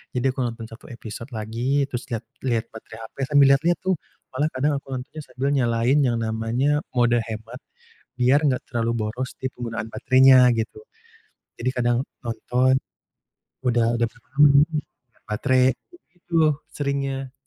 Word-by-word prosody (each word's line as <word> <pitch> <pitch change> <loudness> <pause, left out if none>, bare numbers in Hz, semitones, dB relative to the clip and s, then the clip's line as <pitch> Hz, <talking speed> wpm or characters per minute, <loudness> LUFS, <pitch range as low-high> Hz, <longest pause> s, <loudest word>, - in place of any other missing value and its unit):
Jadi 130 +2 +1
aku 130 - -9
nonton 120 -2 -3
1 115 - -12
episode 115 -1 -8
lagi, 120 +6 -1
terus 125 -3 -5
lihat 115 -1 -4 0.2
lihat 115 -3 0
baterai 110 0 -11
HP, - - -56
sambil 145 -1 +5
lihat-lihat 165 +6 +3
tuh, 185 -4 0 0.3
malah 145 +4 0
kadang 140 +2 +1
aku - - -32
nontonnya 130 +5 -7
sambil 130 +3 -2
nyalain 120 0 +2
yang 125 -4 +2
namanya 115 +6 0 0.2
mode 120 -1 +3
hemat 110 +3 -7 0.6
biar 130 +4 +4
enggak 135 -4 0
terlalu 115 -1 -1 0.2
boros 125 +4 -4
di - - -4
penggunaan 115 -3 -5
baterainya, 130 +3 +5
gitu. 115 - -4 0.7
Jadi 125 +2 -1
kadang 120 -2 +1 0.2
nonton, 125 +2 +1 0.8
udah 120 -3 +2
udah 120 0 +2
berapa 120 - -25
lama 150 - +9
nontonnya, 155 +2 +4 0.4
lihat - - -33
baterai, 130 +4 +2
aku 350 - -21 0.2
gitu - - -30
tuh 165 -2 +4 0.2
seringnya. 140 -2 -3
125 Hz, 160 wpm, -23 LUFS, 115-140 Hz, 0.8 s, lama